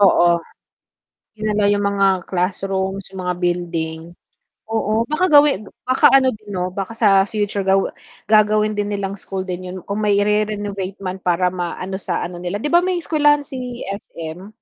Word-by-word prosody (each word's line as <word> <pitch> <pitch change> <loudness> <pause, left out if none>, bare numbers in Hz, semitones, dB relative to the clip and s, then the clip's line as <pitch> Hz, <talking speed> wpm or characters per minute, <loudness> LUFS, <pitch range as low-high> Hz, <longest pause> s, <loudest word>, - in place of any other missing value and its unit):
Oo, 175 -3 +5 0.9
dinala 210 -1 0
yung 205 0 +2
mga 200 0 +2 0.2
classrooms 190 +1 -2
yung 190 -1 -7
mga 180 - 0
building, 170 -2 -1 0.7
oo 220 0 +1
baka 305 +8 0
gawin 290 - +5 0.2
baka 255 +1 +5
ano 260 -1 +5
din 215 -2 -12
'no 180 0 -2
baka 195 +4 -5
sa 195 -3 +4
future 205 -1 -2
ga 190 - +5 0.6
gagawin 215 0 +4
din 205 -1 -2
nilang 200 -1 -3
school 190 -1 -5
din 185 -1 -5
yun 180 +1 -6
kung 200 +1 -3
may 210 -1 +2
i-renovate 205 -2 -1
man 185 0 -4
para 180 0 +1
maano 185 +1 -4
sa - - -2
ano 175 0 -6
nila 175 +2 -4
diba 335 +6 +4
may 365 +1 0
eskwelahan 295 -2 +3
si 250 -3 -6
SM? 180 -2 -7
200 Hz, 160 wpm, -20 LUFS, 185-215 Hz, 0.9 s, Oo